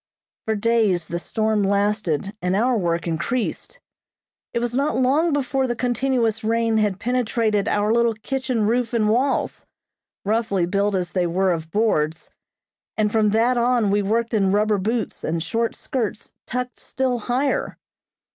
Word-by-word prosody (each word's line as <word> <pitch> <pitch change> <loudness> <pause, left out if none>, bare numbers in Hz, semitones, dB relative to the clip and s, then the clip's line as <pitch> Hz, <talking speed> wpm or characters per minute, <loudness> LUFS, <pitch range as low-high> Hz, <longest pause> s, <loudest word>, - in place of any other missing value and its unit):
For 220 - 0
days 210 -5 +2
the 170 - -4
storm 220 +3 0
lasted 200 -3 0
and 180 +1 0
our 245 +5 +2
work 170 -5 0
increased. 175 +9 -3 0.7
It - - -3
was 240 0 -1
not 280 +4 0
long 280 +6 +2
before 270 -2 0
the 240 - -1
continuous 245 -2 0
rain 225 0 +1
had 205 -3 +1
penetrated 225 -3 0
our 210 +1 +1
little 235 -1 +2
kitchen 255 -1 -2
roof 240 +2 0
and 215 -2 +2
walls, 255 +5 0 0.6
roughly 210 -4 +1
built 200 +2 0
as 180 -2 -2
they 180 -2 0
were 185 +2 +1
of 160 -2 -3
boards, 165 -7 0 0.7
and 210 -1 +1
from 215 -1 +3
that 235 +4 +2
on 235 -4 +2
we 205 +1 +2
worked 230 +4 0
in 195 -3 +2
rubber 210 0 +2
boots 220 +2 -2
and 165 0 -1
short 230 +6 -1
skirts 225 -5 -4
tucked 250 0 -4
still 255 -2 -1
higher. 255 +5 -1
220 Hz, 155 wpm, -22 LUFS, 200-240 Hz, 0.7 s, from